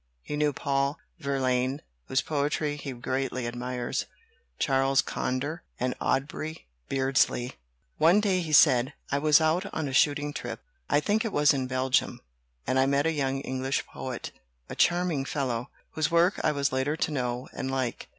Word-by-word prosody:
He - - -4
knew 150 0 +2
Paul 140 +1 0 0.2
Verlaine 130 -1 0 0.3
(whose 130 - +1
poetry 145 0 -1
he 145 -1 -6
greatly 130 0 -2
admires), 120 +1 -3 0.5
Charles 135 0 +2
Conder, 145 +7 -1 0.2
and 125 0 0
Aubrey 155 +4 -2 0.2
Beardsley. 135 -2 +1 0.4
"One 170 +6 +6
day," 195 -3 +2
he 160 -2 -4
said, 135 -3 +5 0.2
"I 140 - +2
was 150 +1 +5
out 165 +5 +1
on 160 -2 -2
a 135 - -4
shooting 145 +1 +2
trip 120 -4 -5 0.3
I 145 - +3
think 210 +7 +1
it 225 - -2
was 145 -3 +4
in 130 -2 -1
Belgium 130 0 +1 0.5
and 130 - +1
I 135 - +4
met 140 +1 +2
a 165 - +3
young 135 -3 -1
English 130 0 -2
poet, - - -6 0.4
a - - -6
charming 175 -5 +2
fellow, 130 -3 -2 0.2
whose 155 -1 0
work 170 +3 +3
I - - +3
was 140 -1 0
later 130 +4 0
to 160 - 0
know 125 -2 -2
and 130 - -4
like. 130 -3 -2
140 Hz, 165 wpm, -28 LUFS, 130-150 Hz, 0.5 s, One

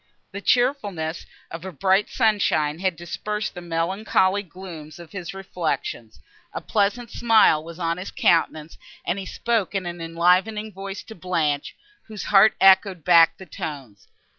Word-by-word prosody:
The 200 - -7
cheerfulness 205 - 0 0.2
of 165 +1 -7
a 190 - -6
bright 190 +5 +1
sunshine 165 -8 +1
had 185 -2 0
dispersed 210 +6 -4
the 180 - -8
melancholy 185 +3 0
glooms 170 -5 -10
of 170 -2 -13
his 185 -4 -6
reflections, 160 - -4 0.3
a - - -3
pleasant 220 +3 -1
smile 220 -9 +4
was 165 0 -10
on 170 -1 -1
his 185 - -6
countenance, 160 -2 0 0.3
and 180 +3 -1
he 190 - -7
spoke 225 -5 -1
in 190 -2 -1
an 175 -1 -6
enlivening 180 +6 +1
voice 195 +1 -7
to 220 - -11
Blanche, 160 -6 -2 0.3
whose 215 -2 -7
heart 205 +1 +5
echoed 190 -3 +5
back 170 -2 +6
the 190 - -11
tones. 135 - -8
185 Hz, 150 wpm, -23 LUFS, 165-200 Hz, 0.3 s, back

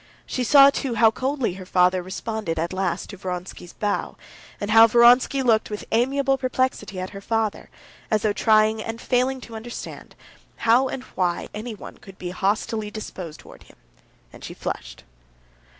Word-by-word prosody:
She 255 - -2
saw, 280 +2 +7
too, 265 -3 -3
how 225 0 +5
coldly 260 -3 -1
her 185 0 -9
father 180 0 +3
responded 190 -1 -4
at 170 +3 -2
last 185 0 -2
to 200 - -10
Vronsky's 180 -1 -6
bow, 205 -1 -2 0.4
and 205 +1 -3
how 225 +1 +8
Vronsky 245 +4 +5
looked 225 -3 +2
with 210 -1 -6
amiable 270 +3 +1
perplexity 255 -7 -1
at 185 - -5
her 195 -1 -9
father, 220 0 -2 0.4
as 215 -2 +1
though 210 -1 +2
trying 215 +1 +3
and 225 +1 -5
failing 255 +2 0
to 230 - -10
understand 235 +2 -8 0.5
how 240 +4 +5
and 255 0 -5
why 175 -2 -1
anyone 215 0 -8
could 195 -1 -14
be 175 -1 -5
hostilely 210 +3 -1
disposed 185 -6 -8
towards - - -16
him, - - -20 0.6
and - - -13
she - - -8
flushed. - - -6
220 Hz, 165 wpm, -23 LUFS, 190-240 Hz, 0.6 s, how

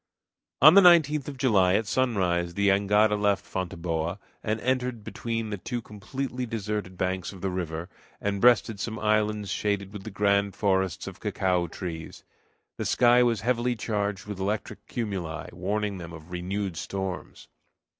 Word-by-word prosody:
On 155 +3 +11
the 200 - +9
19th 155 -6 +5
of 140 -2 -6
July, 100 -8 +4
at 110 - +1
sunrise, 95 -8 0
the 100 0 +3
jangada 105 +2 +3
left 105 -1 +1
Fonteboa, 85 -1 -3 0.2
and 110 0 -1
entered 125 -3 -1
between 115 0 -4
the 105 - -3
two 120 +5 -3
completely 125 +4 -5
deserted 105 -4 -4
banks 95 0 -2
of 95 -3 -12
the 95 - -1
river, 85 -2 -4 0.3
and 100 -1 -2
breasted 115 -3 +4
some 110 +2 -3
islands 105 -2 +1
shaded 100 0 -1
with 105 - -7
the 110 - -6
grand 100 -1 +1
forests 95 -2 0
of - - -8
cacao 90 -2 0
trees. 80 -1 -7 0.5
The - - -3
sky 120 0 +5
was 120 -3 +2
heavily 120 +1 +1
charged 105 -3 -2
with 105 -2 -6
electric 105 +3 -3
cumuli, 95 - -4
warning 100 +2 -2
them 85 -1 -8
of 85 +1 -12
renewed 90 0 -3
storms. 95 0 -5
100 Hz, 155 wpm, -27 LUFS, 95-115 Hz, 0.5 s, On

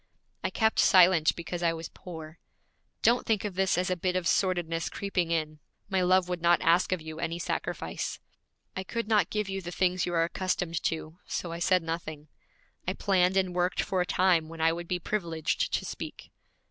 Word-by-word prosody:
I - - +1
kept 220 -1 +1
silent 180 -4 +6
because 170 +1 -5
I 170 -1 +2
was 165 0 -6
poor. 160 -2 -10 0.6
Don't 240 +2 +3
think 215 -2 +1
of 205 - -3
this 190 +1 +1
as 185 +1 0
a - - +2
bit 180 +1 -1
of 185 -1 0
sordidness 175 -4 +1
creeping 185 -4 -2
in. 155 -2 -1 0.3
My 190 -2 +1
love 185 0 +3
would 180 -1 -3
not 170 0 +4
ask 170 +3 +3
of 180 -4 -1
you 160 0 -7
any 170 0 -2
sacrifice. 175 - -3 0.6
I 190 - -3
could 230 +3 -3
not 215 -2 +3
give 210 -1 -1
you 195 0 -3
the 175 - -6
things 180 0 +1
you 175 - -2
are 165 - +4
accustomed 170 -2 -2
to, 160 +1 -3
so 170 - -3
I 170 - -5
said 180 0 +3
nothing. 155 -2 -5 0.6
I 185 - +1
planned 190 -1 +2
and 185 -2 +1
worked 180 +1 +1
for 185 -1 0
a - - +1
time 175 -4 +2
when 165 0 -9
I 165 +1 +3
would 170 0 -6
be 180 - 0
privileged 170 -4 -1
to - - -1
speak.' - - -7
180 Hz, 200 wpm, -29 LUFS, 165-185 Hz, 0.6 s, silent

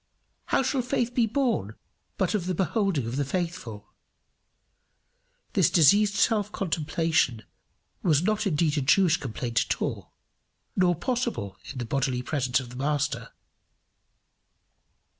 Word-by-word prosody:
How - - +1
shall 260 0 0
faith 245 -1 -1
be 235 -2 +2
born 225 - -1 0.4
but 190 0 0
of 190 -4 -1
the 185 - -1
beholding 190 - 0
of 120 +3 -4
the 145 - +1
faithful? 135 - -4 1.6
This - - +4
diseased 200 +6 +5
self 210 0 +2
contemplation 160 - 0 0.6
was 160 -3 +3
not 215 +1 +1
indeed 150 -3 +1
a - - -1
Jewish 160 +5 +4
complaint 120 -3 -1
at - - 0
all, - - -4 0.6
nor 180 -2 +3
possible 225 - -2 0.2
in - - -9
the 120 - -3
bodily 130 0 -1
presence 130 -3 0
of 125 -2 -8
the - - -10
Master. 145 +1 -1
165 Hz, 130 wpm, -26 LUFS, 130-205 Hz, 1.6 s, diseased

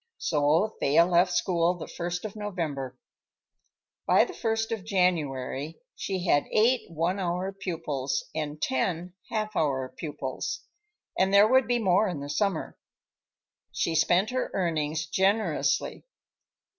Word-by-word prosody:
So 155 +7 +1
Thea 155 +5 +5
left 180 +1 +3
school 175 -1 +1
the 175 - -7
first 175 +2 -4
of 215 - -6
November. 165 -11 -4 1.1
By - - +5
the 375 - -8
first 225 -4 -1
of 220 -4 -3
January 160 -6 -1 0.2
she 190 -2 -3
had 145 -5 +3
eight 235 +2 +2
one 170 +4 -1
hour 180 +1 -1
pupils 160 -8 -3
and 150 -1 -4
ten 170 +6 -1 0.2
half 215 -1 -2
hour 135 -5 0
pupils, 165 - -4 0.6
and 190 +1 +3
there 200 +1 +7
would 260 0 +4
be 245 0 +2
more 200 -1 +3
in 175 -6 -3
the 140 0 -6
summer. 190 +2 -1 0.9
She 165 - -1
spent 175 +6 +3
her 255 0 -1
earnings 160 -3 -1
generously. 200 - 0
175 Hz, 130 wpm, -27 LUFS, 155-200 Hz, 1.1 s, there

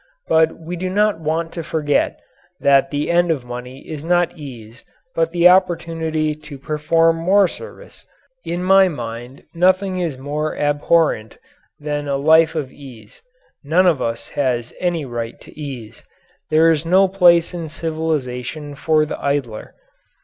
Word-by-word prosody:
But 160 0 +3
we 165 +2 -7
do 185 +2 -3
not 205 -1 +1
want 165 +1 -2
to 165 - -5
forget 150 -2 0 0.4
that 140 -1 +4
the 145 +2 -2
end 175 0 +3
of 145 -6 -1
money 125 +2 -9
is 155 -2 -6
not 175 +1 +1
ease 120 -7 -11 0.3
but 165 0 0
the 175 0 +5
opportunity 165 -4 +1
to 155 -1 -11
perform 165 +3 +1
more 190 +4 +3
service. 465 - -11 0.4
In 175 +1 -3
my 190 +1 +6
mind 120 -2 -7
nothing 185 +2 +2
is 165 -7 -2
more 150 +3 -3
abhorrent 145 -5 +1 0.4
than 145 -1 -3
a 140 -1 0
life 160 +3 +4
of 145 -5 -3
ease. 125 -7 -14 0.4
None 165 +6 +3
of 170 -6 +3
us 115 0 -3
has 125 -4 -2
any 175 -4 -1
right 120 -2 -5
to - - -16
ease. 130 -8 -8 0.5
There 160 +1 +5
is 155 -1 0
no 185 +3 +4
place 175 -3 +4
in 170 -3 -5
civilization 155 -3 -3
for 155 +2 +1
the - - -7
idler. 140 -6 -3
155 Hz, 150 wpm, -19 LUFS, 140-170 Hz, 0.5 s, my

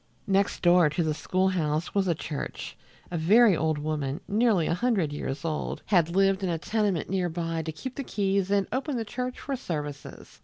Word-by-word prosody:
Next 195 -2 +1
door 175 -2 +6
to 160 +3 -1
the 155 -1 0
school 185 +5 0
house 160 -3 -1
was 195 -2 +1
the 170 - +2
church. 150 -1 -6 0.4
A 170 - -2
very 205 +5 +6
old 155 -1 0
woman, 150 -1 -2
nearly 210 -5 +2
a - - +1
hundred 185 -6 0
years 145 0 -4
old, 155 -2 -3
had 170 -3 +2
lived 195 0 +3
in 190 - -1
a 170 - 0
tenement 205 -1 -1
near 185 -2 0
by 165 -1 -2
to 160 0 -4
keep 255 - -7
the 275 - -5
keys 195 -4 0
and 200 -1 +2
open 270 +1 -2
the 225 - -2
church 250 +4 -4
for 275 - -3
services. 150 - -6
180 Hz, 200 wpm, -27 LUFS, 160-205 Hz, 0.4 s, door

